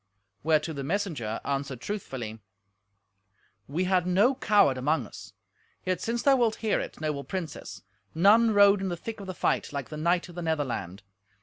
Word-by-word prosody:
Whereto 155 +1 +1
the 140 -2 -5
messenger 150 - -2
answered 140 -2 -2
truthfully, 125 - -5 1.3
"We 160 +7 -1
had 180 -1 +1
no 200 +9 +4
coward 210 - +3
among 135 +1 0
us. - - -12 0.5
Yet 185 -1 -1
since 235 +1 -2
thou 275 -1 +5
wilt 230 -3 +2
hear 215 - +2
it, - - -6
noble 150 -2 -2
princess, 180 -4 -6 0.3
none 210 +7 +6
rode 200 -1 +6
in 190 - -1
the 175 - -3
thick 225 +6 -7
of 200 - -8
the 185 - -5
fight - - 0
like 140 -3 -5
the 155 - -6
knight 170 +4 +1
of 175 - -12
the 175 - -6
Netherland. 125 - -2
170 Hz, 175 wpm, -28 LUFS, 140-200 Hz, 1.3 s, none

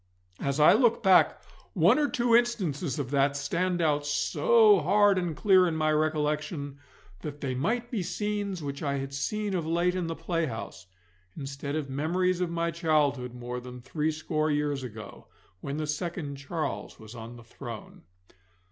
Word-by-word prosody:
As 140 +1 -1
I 150 - +7
look 240 -3 +3
back, 190 -2 +5 0.3
one 190 - +4
or 295 - +2
two 240 -1 +2
instances 185 - 0
of 140 -3 -4
that 140 0 +2
stand 175 +4 -1
out 150 -2 +2
so 430 - +4
hard 205 -2 +4
and 175 -3 -3
clear 185 -3 +5
in 165 - -1
my 155 -1 +1
recollection 150 -1 -1 0.4
that 145 +5 -7
they 135 -3 -2
might 230 - -1
be 225 -6 -1
scenes 200 -1 -3
which 140 -1 -5
I 140 -2 -1
had 135 0 -5
seen 205 +9 -2
of 170 -4 -2
late 170 +2 +1
in 180 -2 -2
the 165 - -3
playhouse, 160 - -4 0.5
instead 140 +1 -5
of 155 -3 -2
memories 175 +6 0
of 180 - 0
my 170 0 -1
childhood 145 -6 0
more 125 0 -5
than 125 0 -9
threescore 155 +3 -1
years 145 -2 0
ago, 110 -5 -9 0.3
when 140 +9 -5
the 155 - -2
second 150 -1 -4
Charles 155 +4 -4
was 110 0 -11
on 115 0 -9
the 120 - -12
throne. 115 - -9
155 Hz, 165 wpm, -28 LUFS, 140-180 Hz, 0.5 s, I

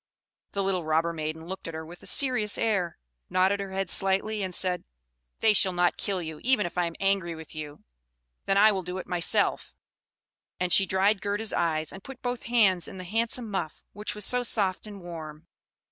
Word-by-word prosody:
The 200 - 0
little 190 -2 0
robber 160 +2 +1
maiden 160 0 -4
looked 190 +1 -7
at 165 - -6
her 160 0 -5
with 175 +2 -11
a - - -10
serious 250 -7 +1
air, 190 -7 0 0.3
nodded 190 +2 +2
her 195 -1 -5
head 195 0 -1
slightly, 195 +4 +2
and 185 -2 -2
said, 180 -2 0 0.6
"They 220 -1 +5
shall 190 -2 +3
not 175 0 +2
kill 190 -4 -2
you, 160 -1 -7
even 255 -5 +3
if 175 - -5
I 180 -1 +2
am 165 -1 -5
angry 195 -4 +1
with 160 -1 -9
you: 150 -2 -8 0.6
then 195 - +3
I 215 +2 +7
will 195 -2 -1
do 180 +1 -5
it 185 - -5
myself"; 175 -1 +1 0.8
and 180 -1 +1
she 195 - +6
dried 190 +2 +2
Gerda's 205 +1 -2
eyes, 160 -2 0
and 190 0 -10
put 270 -1 -11
both 245 -1 -2
her - - -7
hands 195 -8 +4
in - - -9
the 185 - -6
handsome 225 +4 -1
muff, 190 -5 -4
which 210 +1 -4
was 210 -2 0
so 250 0 +5
soft 205 -4 0
and 205 -2 -9
warm. 160 -2 -8
190 Hz, 205 wpm, -27 LUFS, 170-205 Hz, 0.8 s, I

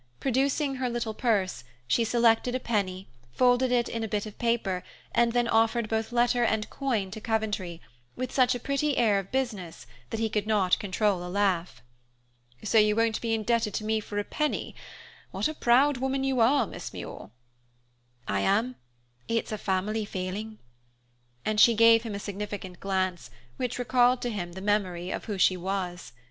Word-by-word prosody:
Producing 270 +2 0
her 255 -1 -1
little 235 -2 -2
purse, 200 - 0 0.2
she 230 - +2
selected 235 +1 +2
a - - 0
penny, 195 -6 -2 0.3
folded 250 - +3
it 240 -1 +2
in 230 -1 -3
a - - -2
bit 210 0 -2
of 215 - -10
paper, 225 -6 0 0.3
and 235 0 +3
then 240 0 +1
offered 225 0 +2
both 220 +1 -2
letter 240 0 +2
and 220 -2 0
coin 230 -9 -1
to 220 +2 -7
Coventry, 210 -6 -2 0.4
with 255 0 -4
such 255 -1 +3
a - - -4
pretty 280 +3 0
air 215 -4 +3
of 195 - -8
business, 210 - -3 0.2
that 225 - -3
he 225 - +1
could 210 -1 -2
not 200 -4 +2
control 200 -2 0
a 180 - -6
laugh. 180 -9 0 0.8
"So 220 +1 +4
you 210 0 +4
won't 225 -1 +1
be 230 -1 0
indebted 220 -1 0
to - - -2
me 220 0 +1
for 205 -1 -7
a 205 - +1
penny? 300 +7 -2 0.6
What - - -1
a 310 - -4
proud 270 +1 +3
woman 265 +1 -1
you 265 -2 0
are, 260 +5 +4
Miss - - -8
Muir." - - -8 1.0
"I 100 0 0
am; 225 - +1 0.5
it's 230 -1 -1
a 215 - -2
family 200 +3 -1
failing." 205 +3 -5 0.9
And 215 -1 0
she 235 +1 +7
gave 230 0 +6
him 225 -3 -5
a - - -4
significant 200 -3 -6
glance, 185 -7 -2 0.3
which 250 -2 -2
recalled 245 0 +3
to 245 - -1
him 175 -5 -4
the 190 - -8
memory 190 -3 -1
of - - -4
who 210 -3 -3
she 185 0 +4
was. 180 -1 -4
220 Hz, 180 wpm, -27 LUFS, 195-240 Hz, 1.0 s, she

